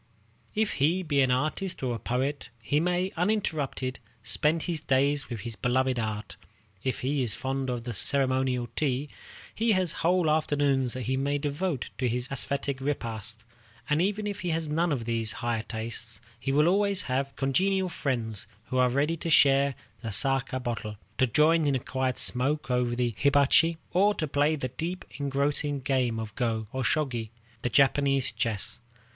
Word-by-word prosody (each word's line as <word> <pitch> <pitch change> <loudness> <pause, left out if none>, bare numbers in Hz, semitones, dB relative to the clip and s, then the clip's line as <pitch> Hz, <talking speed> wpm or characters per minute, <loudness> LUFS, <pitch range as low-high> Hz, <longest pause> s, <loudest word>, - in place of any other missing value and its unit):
If 215 0 +1
he 170 +6 +3
be 145 -4 +2
an 130 - +3
artist 155 +7 -1
or 125 -2 0
a 115 - -4
poet, 135 +5 -2
he 130 +7 +1
may, 180 +3 0
uninterrupted, 160 -9 -1 0.2
spend 155 +2 +1
his 170 -4 -2
days 140 0 +1
with 115 -4 -5
his 115 0 -5
beloved 130 +2 +1
art. 110 -2 -4 0.5
If 130 - -2
he 140 +2 0
is 115 -4 0
fond 135 0 -2
of 120 -2 -2
the 120 0 -4
ceremonial 130 +1 +1
tea, 140 -1 0 0.4
he 225 0 +2
has 185 -4 +2
whole 175 +1 +3
afternoons 145 -4 +2
that 130 - -4
he 130 +4 0
may 140 +2 0
devote 145 +1 -2
to 125 -2 +1
this 125 +1 -1
æsthetic 140 0 -2
repast; 115 -5 -3 0.5
and 150 +2 +3
even 205 +3 0
if 205 -1 -3
he 180 - -3
has 160 -1 -1
none 165 +3 +1
of 125 -6 -1
these 115 -2 -1
higher 115 -2 -1
tastes, 110 -1 -3 0.2
he 135 - -2
will 150 +3 +4
always 200 +1 +3
have 135 +1 -2
congenial 190 +8 +1
friends 120 - -2 0.2
who 130 - 0
are 125 0 +5
ready 145 +6 +1
to 165 - -4
share 140 -2 +5 0.3
the 115 - -4
saké 130 +4 0
bottle, 115 -3 -4 0.2
to 130 - +4
join 155 +5 +4
in 140 - +2
a - - +1
quiet 130 0 -2
smoke 130 +1 0
over 125 -1 +1
the 120 -1 0
hibachi, 145 +3 +4
or 205 +3 +3
to 155 - -2
play 145 +2 +2
the 130 -4 -3
deep 165 +8 -4
engrossing 145 +1 0
game 130 -4 0
of 110 -2 -5
go, 115 -2 -1
or 130 - -2
shogi, 120 -5 0 0.3
the 125 - 0
Japanese 135 0 +3
chess. 115 -2 -2
135 Hz, 175 wpm, -28 LUFS, 125-155 Hz, 0.5 s, are